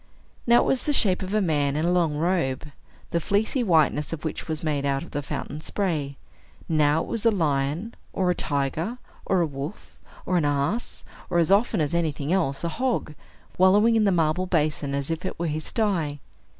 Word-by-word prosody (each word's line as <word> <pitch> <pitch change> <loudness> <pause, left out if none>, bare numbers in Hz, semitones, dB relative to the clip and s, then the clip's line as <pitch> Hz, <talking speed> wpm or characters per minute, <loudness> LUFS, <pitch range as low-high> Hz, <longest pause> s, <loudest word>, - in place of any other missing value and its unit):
Now 235 0 +6
it - - 0
was 265 - 0
the 295 - +1
shape 190 -8 +3
of 190 0 -4
a 215 - +3
man 145 -6 +1
in 155 +2 0
a 175 - +2
long 170 -4 +2
robe, 160 -5 0 0.4
the 170 - +1
fleecy 205 - 0
whiteness 155 -6 +2
of 165 -1 -5
which 155 - -4
was 160 -1 -3
made 150 -3 0
out 140 +1 0
of - - -12
the 145 - -2
fountain's 145 +1 -6
spray; 155 -9 -2 0.5
now 155 -1 +3
it - - -9
was 230 -3 -3
a 230 - +6
lion, 160 +2 0 0.2
or 185 -2 +1
a - - +2
tiger, 155 - -2 0.3
or 190 -2 +3
a - - +3
wolf, 145 +4 -7 0.3
or 180 - +1
an 160 - +2
ass, 145 +11 -1 0.2
or, 175 - 0
as 170 +1 +3
often 210 0 +3
as 150 -1 0
anything 155 -2 0
else, 160 -7 0
a 170 - 0
hog, 250 -6 -1 0.5
wallowing 205 +5 +5
in 220 -1 +3
the 200 - +4
marble 170 +1 +1
basin 150 -4 0
as 140 +2 -2
if 165 +1 -3
it 185 - -4
were 170 - -2
his 155 -1 -2
sty. 170 -10 -1
165 Hz, 205 wpm, -25 LUFS, 145-190 Hz, 0.5 s, Now